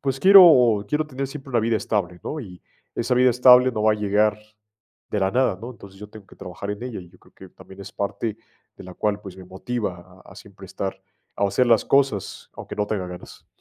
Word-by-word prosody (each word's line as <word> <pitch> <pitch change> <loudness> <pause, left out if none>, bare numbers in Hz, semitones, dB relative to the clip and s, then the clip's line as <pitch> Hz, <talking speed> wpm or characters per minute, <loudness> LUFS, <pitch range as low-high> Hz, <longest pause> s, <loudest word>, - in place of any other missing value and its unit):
pues, 135 -1 -3
quiero 150 - +7
quiero 150 +1 -1
tener 135 -2 -5
siempre 135 -1 -10
una 120 -3 +1
vida 115 0 0
estable, 90 -5 -3
¿no? 155 - -5
Y 90 -8 -12 0.3
esa 120 +2 -1
vida 125 +1 +4
estable 125 +1 +6
no 105 - -3
va 110 - +4
a - - 0
llegar 105 +1 +1 0.7
de 105 - -2
la 95 - +1
nada, 125 -7 +1
¿no? 120 +2 -8
Entonces, 100 -4 -15
yo 105 - -10
tengo 105 -2 -14
que - - -18
trabajar 95 +2 -8
en 105 +3 -6
ella. 125 -5 -6
Y 90 - -14
yo 90 - -22
creo - - -25
que 95 - -14
también 95 +1 -15
es 95 - -10
parte, 100 +2 -4 0.4
de - - -12
la 90 - -11
cual, 105 +1 -2
pues 95 -2 -11
me 95 - -12
motiva 95 -2 -6
a - - -16
a - - -17
siempre 100 -3 -14
estar 95 +1 -6 0.4
O - - 0
a - - -1
hacer 125 +5 +1
las 115 -3 +3
cosas, 135 -9 0
aunque - - -9
no 105 0 -1
tenga 100 -4 -3
ganas. 90 0 -12
105 Hz, 240 wpm, -22 LUFS, 95-125 Hz, 0.7 s, quiero